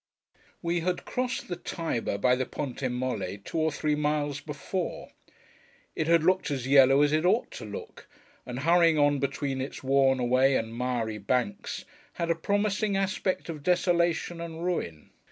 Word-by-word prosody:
We 170 +1 0
had 180 +1 -2
crossed 255 0 -2
the 175 - -3
Tiber 165 -11 -3
by 125 +5 +3
the 130 0 -2
Ponte 140 -3 -5
Molle 125 -6 -3
two 165 - -3
or 160 0 +2
three 150 +1 0
miles 150 -1 0
before. 150 +5 -5 0.8
It 160 - -1
had 165 -1 +4
looked 185 +1 +2
as 135 -3 -3
yellow 135 +1 +6
as 145 0 +2
it 155 +1 +2
ought 190 +6 +2
to - - -8
look, 105 -1 -9 0.4
and 125 +2 -6
hurrying 165 0 +4
on 145 -1 +3
between 140 -1 -2
its 135 +1 -6
worn 135 0 +3
away 130 +2 +3
and 115 -1 -2
miry 120 -3 -2
banks, 105 0 -2 0.3
had 170 0 -1
a - - +2
promising 205 +3 0
aspect 195 -1 -1
of 160 -3 -6
desolation 175 0 +1
and 165 0 -6
ruin. 85 - -3
145 Hz, 165 wpm, -28 LUFS, 130-170 Hz, 0.8 s, yellow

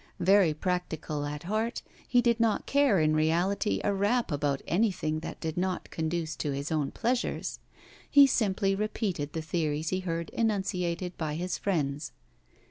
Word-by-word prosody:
Very 185 -3 +4
practical 160 -4 -2
at 150 +1 -5
heart, 215 +6 -2 0.2
he 245 -1 +3
did 235 -1 +2
not 225 -2 +2
care 275 -9 +3
in 155 0 +3
reality 175 +7 +1
a 205 - +1
rap 205 +2 +1
about 145 -1 -1
anything 175 -6 +1
that 160 - -7
did 160 0 -4
not 185 0 -2
conduce 160 -1 -2
to 150 - -2
his 140 +2 -3
own 150 -3 0
pleasures; 245 +1 -2 0.5
he 285 -1 +8
simply 200 -6 +1
repeated 195 -7 -2
the 160 - -3
theories 155 -1 -1
he 185 - 0
heard 170 -2 -3
enunciated 180 -5 -1
by 155 -2 -2
his 180 +3 -3
friends. 150 -6 -1
175 Hz, 155 wpm, -29 LUFS, 155-205 Hz, 0.5 s, he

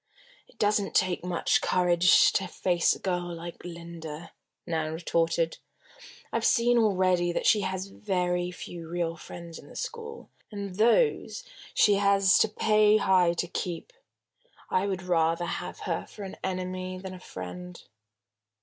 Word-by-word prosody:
"It - - -24
doesn't 205 -1 +1
take 185 -2 +2
much 180 -2 +1
courage 180 -1 +4
to 190 - 0
face 175 0 +1
a - - -12
girl 175 -2 -2
like 170 +1 -9
Linda," 170 -2 -8 0.3
Nan 160 -2 -2
retorted. 165 0 0 0.7
"I've - - 0
seen 240 0 +4
already 185 -5 +2
that - - -2
she 210 - +5
has 190 -1 -3
very 180 -3 -1
few 170 -2 -8
real 170 -1 -2
friends 170 0 -10
in - - -14
the - - -14
school, 465 -1 -7 0.2
and 200 -3 -6
those 440 - +2 0.3
she 205 -1 +5
has 200 -2 +4
to - - +4
pay 215 0 +4
high 185 -4 +3
to 175 +1 -2
keep. 180 - -5 0.8
I 185 +2 +2
would 190 -2 -3
rather 165 -1 +1
have - - -5
her - - -3
for 210 - -10
an 190 - -8
enemy 185 0 -3
than 185 0 -7
a 185 - -9
friend." 180 - -8
180 Hz, 150 wpm, -28 LUFS, 170-200 Hz, 0.8 s, she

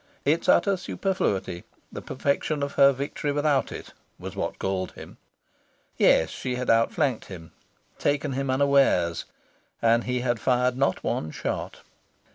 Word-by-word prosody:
Its 155 +4 +1
utter 200 -1 +4
superfluity 100 - -2 0.3
the - - -7
perfection 140 +2 -1
of 140 - -2
her 140 0 +6
victory 140 +2 -3
without 145 -1 +1
it - - -9 0.2
was - - -8
what - - -3
galled 95 -1 -2
him. - - -12 0.8
Yes, 80 -1 +4
she 125 -1 -4
had 125 0 0
outflanked 115 +3 +1
him, 85 -4 -10 0.5
taken 145 0 0
him 135 +1 -2
unawares, 130 -11 +2 0.5
and 115 0 +3
he 125 0 -1
had 120 -2 0
fired 125 0 +1
not 135 +2 0
one 80 - -2
shot. - - -4
130 Hz, 140 wpm, -26 LUFS, 115-140 Hz, 0.8 s, her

